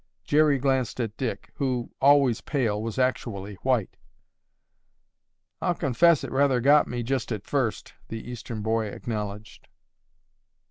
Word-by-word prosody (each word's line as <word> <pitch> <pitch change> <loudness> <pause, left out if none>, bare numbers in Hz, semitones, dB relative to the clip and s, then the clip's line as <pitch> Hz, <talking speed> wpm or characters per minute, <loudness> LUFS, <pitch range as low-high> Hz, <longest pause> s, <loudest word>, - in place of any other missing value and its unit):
Jerry 150 -1 +3
glanced 130 -3 0
at 115 -3 -2
Dick, 115 -6 -4
who, 130 -3 -1
always 140 -4 +5
pale, 115 -8 -1
was 115 +2 -4
actually 110 -6 -1
white. 125 -7 0 1.6
"I'll 175 -1 +1
confess 160 +2 +3
it - - -5
rather 135 -1 +3
got 145 +4 +5
me, 120 -1 -3
just 130 0 -2
at 105 -4 -4
first," 130 -6 -2
the 115 +1 -7
Eastern 115 -3 -6
boy 110 0 0
acknowledged. 105 0 -6
125 Hz, 130 wpm, -26 LUFS, 110-135 Hz, 1.6 s, always